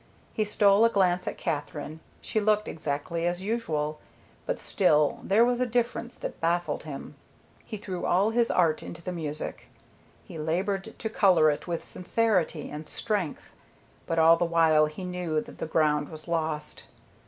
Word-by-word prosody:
He 215 - 0
stole 205 0 +4
a 230 - +6
glance 180 -4 +1
at - - -3
Katherine. 150 +1 -4 0.2
She 220 - -1
looked 210 0 +2
exactly 160 +2 -2
as 175 +1 -2
usual, 155 -9 -2 0.5
but - - -1
still 150 -7 +2
there 215 +4 +4
was 245 0 +1
a 255 - +2
difference 240 0 -1
that - - -7
baffled 170 -2 0
him. 145 -1 -7 0.5
He 215 - -6
threw 190 -3 -4
all 195 +5 +3
his 235 0 +2
art 165 -4 +2
into 170 0 -9
the 180 - -3
music. 155 -4 -5 0.6
He 160 - -9
labored 190 +7 -2
to 220 - -3
color 175 -8 +5
it 145 - -5
with 170 -1 -3
sincerity 180 -5 0
and 150 +1 -7
strength. 205 -9 -2 0.6
But 165 - -1
all 165 +1 +7
the 175 - +1
while 160 -2 +4
he 155 +5 -8
knew 180 -3 -2
that - - -10
the - - -3
ground 150 -2 +1
was 155 0 -10
lost. 160 -2 -2
170 Hz, 165 wpm, -27 LUFS, 155-205 Hz, 0.6 s, all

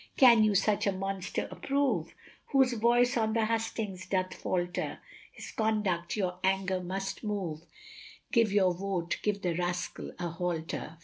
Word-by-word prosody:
Can 235 -4 +8
you 210 -1 +3
such 205 +2 +2
a - - +4
monster 195 0 -3
approve, 280 0 0 0.3
Whose 265 -3 +3
voice 240 +2 +3
on 220 -1 +1
the 225 -1 +2
Hustings 220 -4 -2
doth 185 -1 0
falter? 175 0 -2 0.3
His - - -9
conduct 210 -6 0
your 180 -3 -1
anger 190 0 +1
must 190 +2 -4
move 190 -8 -3 0.7
Give 230 -4 +4
your 190 -3 +4
Vote 180 -2 -2
give 205 -1 -1
the 175 -2 +1
Rascal 175 +1 -3
a 175 - -2
Halter. 165 -2 -3
195 Hz, 145 wpm, -30 LUFS, 180-220 Hz, 0.7 s, Can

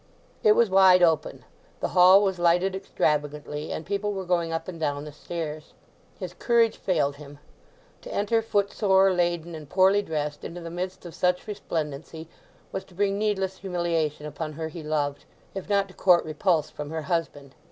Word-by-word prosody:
It 210 - +6
was 230 -3 +3
wide 190 -1 +6
open, 160 -3 +1 0.3
the - - -2
hall 185 +3 +7
was 190 -3 -1
lighted 175 +3 +2
extravagantly, 150 -4 -2
and 160 - -5
people 205 +1 -2
were 190 -1 -4
going 170 -2 0
up 165 0 -3
and 175 -3 -7
down 145 -2 -2
the 150 - -8
stairs. 155 0 -6 0.4
His 180 -2 -6
courage 230 +2 +2
failed 145 -6 0
him; 145 -1 -12 0.6
to - - -9
enter 220 +3 +1
footsore, 200 -2 +2
laden, 175 -1 -1
and 155 -3 -9
poorly 190 +4 +4
dressed 150 -5 -4
into 175 - -6
the 165 0 -7
midst 180 +2 -5
of 170 - -8
such 180 0 0
resplendency 160 -6 -5 0.4
was 190 - -4
to 180 - -20
bring 200 +1 0
needless 195 -3 -1
humiliation 170 -5 -2
upon 155 +1 -5
her 160 +1 -5
he 165 +1 -8
loved, 145 -2 -2 0.3
if 195 0 -7
not 200 -1 +2
to - - -14
court 180 -2 +4
repulse 155 0 0
from 150 -1 -7
her 160 0 -4
husband. 150 -6 -3
175 Hz, 175 wpm, -26 LUFS, 155-190 Hz, 0.6 s, hall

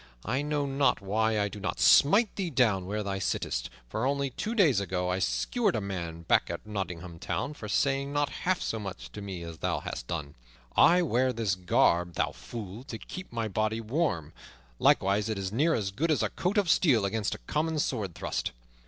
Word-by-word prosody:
I 130 - 0
know 145 -1 -1
not 135 0 +2
why 110 +2 +1
I 100 - +2
do 105 +1 -8
not 90 -2 -3
smite 205 +10 +5
thee 190 -3 -2
down 110 - +2
where 105 +2 -2
thou 100 -1 -2
sittest, - - -2 0.2
for 85 - -3
only 140 -1 0
two 220 - -3
days 160 - +4
ago 90 -2 -2
I 90 +1 0
skewered 95 - +1
a - - +1
man 95 -4 -3
over 80 0 -8
back - - +3
of - - -5
Nottingham 90 -5 -5
Town 145 - -2
for 110 - -8
saying 140 +3 +1
not 145 0 +1
half 185 0 +1
so 110 - -2
much 95 -3 -7
to 105 - -8
me 95 -4 -6
as 85 -1 -8
thou - - 0
hast - - -6
done. 75 -4 -4 0.4
I 175 +3 +6
wear 130 -4 +2
this 110 -5 0
garb, 90 -1 +2
thou - - +1
fool, 110 0 -8
to 115 - -6
keep 185 +10 -9
my 115 -2 -2
body 110 +2 0
warm; 110 - -1 0.5
likewise 100 +3 +3
it 110 - -1
is 95 -1 -3
near 150 +9 +2
as 100 -3 -1
good 150 +12 -1
as 155 - +2
a - - +1
coat 185 +5 -1
of 200 -3 +3
steel 140 - +4
against 105 +1 -1
a - - -15
common 160 +1 0
sword 110 - -1
thrust. - - -3
110 Hz, 210 wpm, -29 LUFS, 95-140 Hz, 0.5 s, I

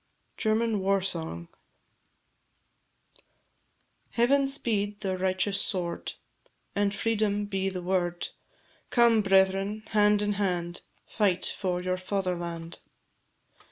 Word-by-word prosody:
GERMAN 220 -1 +1
WAR 195 +1 +2
SONG. 160 - -3 2.7
Heaven 270 +5 +3
speed 210 -6 -1
the 190 -2 -1
righteous 190 +2 0
sword, 175 -3 -3 0.6
And 205 0 +2
freedom 205 -1 0
be 195 -1 -1
the 185 -2 -5
word; 175 -1 -1 0.6
Come, 235 -2 +5
brethren, 195 +2 +2
hand 210 -1 +4
in 205 0 +1
hand, 175 -3 -1 0.2
Fight 195 -5 +1
for 180 -2 -2
your 185 0 0
fatherland. 175 -3 -3
195 Hz, 95 wpm, -28 LUFS, 185-210 Hz, 2.7 s, Come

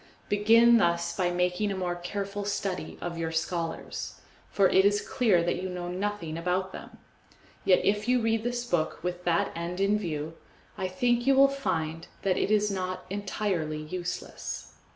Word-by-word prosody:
Begin 230 +3 +6
thus 170 -2 +1
by 180 -2 +1
making 180 +3 0
a 195 - -3
more 180 -1 -1
careful 200 +3 -4
study 200 -2 -3
of 170 -1 -4
your 165 -1 -2
scholars, 165 +1 -3 0.3
for 195 -1 +4
it 190 - +5
is 205 +1 +4
clear 205 -9 +3
that 175 +1 -1
you 185 - -3
know 180 -1 -4
nothing 180 -4 -3
about 185 +2 -1
them; - - -10 0.7
yet 185 - +4
if 210 +2 +1
you 250 0 +4
read 225 -1 +1
this 245 0 -2
book 170 -7 -1
with 180 0 -3
that 170 -1 +2
end 170 +2 -4
in 200 +2 +3
view, 160 -4 -3 0.4
I 185 - -2
think 240 +6 +1
you 275 - +6
will 275 +1 +7
find 165 - -2 0.2
that 190 -2 +2
it - - 0
is 210 -1 +3
not 185 -1 -3
entirely 190 -6 -2
useless. 175 +3 -5
185 Hz, 175 wpm, -28 LUFS, 175-205 Hz, 0.7 s, will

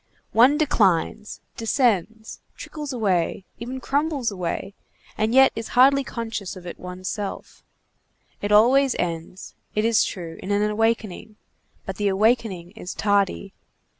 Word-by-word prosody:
One 255 +6 +5
declines, 210 - +1 0.2
descends, 225 - 0 0.2
trickles 300 -2 -7
away, 195 -6 0
even 250 +3 -5
crumbles 280 -2 -1
away, 185 +1 -4 0.4
and 215 +1 0
yet 265 +2 +6
is 225 0 -5
hardly 275 +2 +6
conscious 225 -6 -5
of 180 -1 -11
it 175 - -8
one's 180 +1 -8
self. 205 -1 -6 0.8
It 205 - -2
always 255 +5 +5
ends, 170 +1 -4 0.2
it 215 +1 +1
is 230 -1 +4
true, 170 -3 -6
in 190 - -7
an 205 +1 +2
awakening, 220 -1 -1 0.5
but 195 - -5
the 205 - 0
awakening 200 -3 +1
is 190 -4 -8
tardy. 200 -1 0
215 Hz, 135 wpm, -23 LUFS, 190-240 Hz, 0.8 s, yet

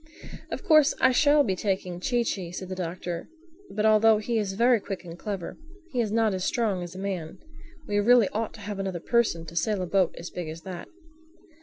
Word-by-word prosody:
"Of - - -5
course 310 -6 +5
I 260 - +5
shall 290 +2 +5
be 190 -7 0
taking 185 -2 -2
Chee 240 +5 +1
Chee," 185 -6 -3
said 185 +1 -6
the 185 - -4
Doctor. 175 -1 -5 0.4
"But 215 +1 -1
although 220 0 +6
he 225 +2 -1
is 200 -2 -2
very 235 +3 +4
quick 195 -2 -6
and 165 -1 -8
clever, 195 -1 -5 0.3
he 250 - +1
is 215 -3 -2
not 220 -2 +2
as 185 -1 -2
strong 210 -6 0
as 175 0 -7
a - - -7
man. 190 -4 -4 0.5
We 205 0 +1
really 235 0 +5
ought 220 0 -3
to 215 - -12
have 205 -1 -5
another 190 -3 -3
person 215 -5 +1
to 165 +1 -10
sail 200 +5 0
a 185 - -1
boat 185 0 +1
as 170 - -7
big 175 -3 -5
as 160 +1 -8
that." 180 -2 -7
195 Hz, 215 wpm, -27 LUFS, 180-225 Hz, 0.5 s, although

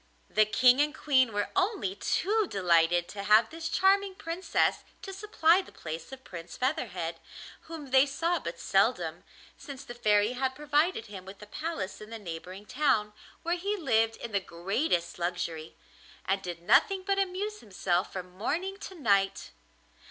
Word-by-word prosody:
The 215 -1 +4
King 250 +4 +5
and 300 +1 0
Queen 260 -5 +3
were 205 -1 -1
only 385 0 0
too 420 +1 +1
delighted 175 -2 +3
to 200 +1 -6
have 215 +3 +5
this 325 0 -5
charming 390 +2 +3
Princess 360 -1 0 0.2
to 390 - -6
supply 380 -3 +3
the - - -15
place 160 +4 -7
of 265 0 -10
Prince 170 -2 -9
Featherhead, 190 - -2 0.5
whom 310 -5 -8
they 265 +2 +6
saw 335 +5 0
but - - -6
seldom, - - +1 0.4
since 280 -3 -9
the 240 - -8
Fairy 210 -2 +3
had 260 +1 -2
provided 295 0 +1
him 195 -3 -9
with 195 +1 -11
a - - -9
palace 215 - -5
in 215 - -10
the 230 - -6
neighbouring 185 +1 -8
town, 215 -6 +1 0.3
where 345 +1 0
he 400 +4 -2
lived 225 - +2
in 235 - -7
the 200 - +2
greatest 175 - -1
luxury, 170 -2 -3 0.5
and 195 +1 0
did 175 -2 -6
nothing 345 - +4
but 395 0 +1
amuse 395 +3 -2
himself 185 - -1
from 185 -1 -6
morning 340 - -2
to 390 -1 -9
night. 200 - +1
245 Hz, 165 wpm, -29 LUFS, -, 0.5 s, they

